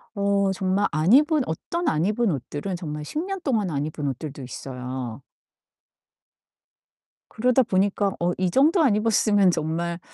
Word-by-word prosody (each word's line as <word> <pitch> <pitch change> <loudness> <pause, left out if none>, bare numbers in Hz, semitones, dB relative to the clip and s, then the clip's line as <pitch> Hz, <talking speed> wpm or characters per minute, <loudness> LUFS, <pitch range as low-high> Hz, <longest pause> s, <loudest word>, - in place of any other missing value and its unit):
어 200 -1 +1
정말 190 +2 0
안 155 +5 +1
입은 300 +1 +5
어떤 340 - -3
안 155 +2 0
입은 215 +1 +1
옷들은 145 +6 -4
정말 150 -4 -6
10 300 - -4
년 390 -1 -4
동안 220 - 0
안 145 -1 -1
입은 150 -1 -4
옷들도 140 +2 -5
있어요. 125 -1 -6 2.1
그러다 250 +3 +2
보니까 200 -1 +1
'어 175 +1 +1
이정도 270 - +3
안 260 -9 +4
입었으면 210 -3 +3
정말 170 +2 -2
190 Hz, 265 characters per minute, -24 LUFS, 155-220 Hz, 2.1 s, 입은